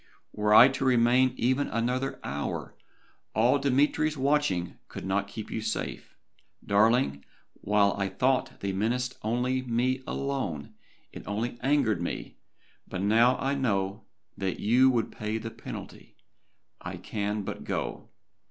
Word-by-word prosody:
Were 105 0 0
I 115 +4 +10
to 135 0 -2
remain 125 0 +4
even 130 +4 +1
another 125 +4 -1
hour, 70 +1 -4 0.6
all 120 +6 +4
Dmitry's 145 +3 +2
watching 135 -11 0
could - - -8
not 100 +1 0
keep 110 +1 -8
you 110 - -3
safe. 110 0 -4 0.5
Darling, 105 - +3 0.3
while 100 0 +2
I 100 -1 -1
thought 130 +7 0
they 100 -1 -2
menaced 120 +5 -1
me 125 +2 0
alone, 130 - -3 0.4
it - - -9
only 115 +4 -3
angered 130 - +2
me, 85 - -5 0.5
but 90 - -4
now 115 +5 +4
I 135 +1 -1
know 100 -7 -1 0.3
that 95 -2 -3
you 125 +5 +5
would 120 -4 0
pay 105 +1 -3
the 115 +1 -6
penalty, - - -9 0.7
I - - -6
can 105 0 -3
but - - -6
go. - - -4
115 Hz, 135 wpm, -28 LUFS, 100-130 Hz, 0.7 s, I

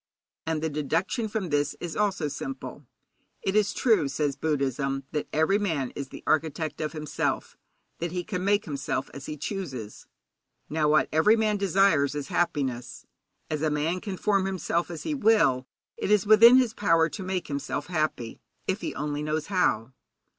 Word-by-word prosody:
And 160 -1 -1
the 160 - +1
deduction 165 - -1
from 210 -4 -3
this 145 -1 0
is 170 -2 -5
also 195 -7 0
simple. 135 -1 -6 0.6
It 195 - 0
is 210 -1 +3
true, 215 - +3
says 140 0 -1
Buddhism, 135 -2 -1
that 150 - -2
every 160 +7 +2
man 160 -11 -1
is 140 -1 -5
the - - -10
architect 155 0 0
of 155 +1 -2
himself, 155 -2 -2 0.4
that 170 0 -2
he 180 0 -2
can 180 -2 -4
make 205 +1 +2
himself 140 -2 -3
as 140 0 -8
he 155 - -5
chooses. 140 - -6 0.6
Now, 150 -1 +2
what 155 +1 +4
every 160 +8 +5
man 215 -2 +1
desires 190 -7 +3
is 145 -2 -4
happiness. 135 -8 -1 0.4
As 155 -1 -3
a 155 - +2
man 155 +5 -1
can 195 -3 -5
form 195 -1 +1
himself 175 -2 -1
as 165 -3 -6
he 310 - -2
will, 215 - +3 0.3
it - - -3
is 210 -2 +4
within 230 +4 +8
his 250 -4 +3
power 165 -7 +3
to 200 - -7
make 185 -1 -2
himself 140 -1 -3
happy, 155 -9 -2 0.2
if 190 +3 -1
he - - -4
only 145 +1 -2
knows 155 0 -1
how. 125 - +1
160 Hz, 175 wpm, -27 LUFS, 145-195 Hz, 0.6 s, within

